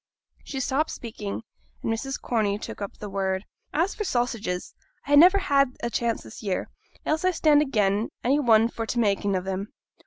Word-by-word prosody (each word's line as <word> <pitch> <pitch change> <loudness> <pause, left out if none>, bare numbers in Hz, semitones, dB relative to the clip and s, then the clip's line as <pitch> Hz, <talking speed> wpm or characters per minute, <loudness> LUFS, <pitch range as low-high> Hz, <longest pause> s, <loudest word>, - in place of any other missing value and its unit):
She 270 - -5
stopped 275 +4 0
speaking, 220 -3 -6 0.4
and 225 - +1
Mrs. 270 +4 -3
Corney 210 -4 0
took 210 - -8
up 200 - -5
the 210 - -6
word 190 0 -1 0.3
'As 335 +7 +1
for 425 - -3
sausages, 235 - -2 0.3
I 285 - -5
ha' - - +7
niver 360 +7 +8
had 275 -9 +2
a 235 - -1
chance 235 -1 -1
this 110 - -11
year, 195 -3 -2 0.4
else 315 +3 0
I 370 - +4
stand 305 -4 +4
again 210 -6 +1
any 275 +4 +3
one 225 -4 +5
for 230 -1 -5
t' 240 - -1
making 200 -2 +1
of 185 0 -2
'em. 195 +2 -3
230 Hz, 190 wpm, -26 LUFS, 200-280 Hz, 0.4 s, niver